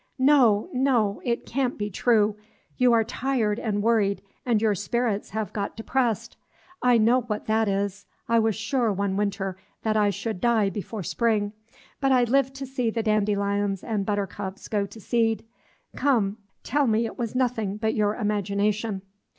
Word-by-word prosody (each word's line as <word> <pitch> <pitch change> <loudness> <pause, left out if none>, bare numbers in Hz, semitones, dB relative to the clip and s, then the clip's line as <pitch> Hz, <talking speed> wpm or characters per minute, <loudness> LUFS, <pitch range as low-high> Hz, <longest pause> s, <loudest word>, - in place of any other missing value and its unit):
No, 260 -6 +4
no, 245 -6 +1
it 235 -1 -1
can't 255 -1 -1
be 205 0 -3
true, 215 0 +2 0.4
you 250 -1 +4
are 230 -1 +4
tired 230 -2 -1
and 205 -2 -1
worried, 210 -4 +2 0.2
and 230 -3 +3
your 215 -1 +2
spirits 225 +1 -1
have 215 -1 -4
got 200 0 -3
depressed. 235 -1 -1 0.4
I 250 -1 +5
know 235 +3 +4
what 215 -3 -4
that 220 0 +2
is; 200 0 -2 0.2
I 230 0 +4
was 220 -2 +1
sure, 230 +1 0
one 200 0 -1
winter, 195 -2 -2 0.3
that 220 -1 +1
I 210 -1 +3
should 200 0 -4
die 225 -4 +3
before 205 +2 -5
spring; 215 +1 0 0.5
but 270 -1 +2
I 250 -2 +5
lived 270 +2 +2
to 270 0 -5
see 250 -3 -1
the 225 0 -2
dandelions 205 -2 0
and 215 -3 -1
buttercups 200 -1 -3
go 205 -2 0
to 220 - -12
seed. 225 0 0 0.5
Come, 220 -8 +1 0.3
tell 285 0 +1
me 225 +1 +2
it 225 - -7
was 235 0 -3
nothing 230 -6 0
but 220 0 0
your 210 0 +1
imagination." 205 -1 -1
220 Hz, 165 wpm, -25 LUFS, 205-240 Hz, 0.5 s, I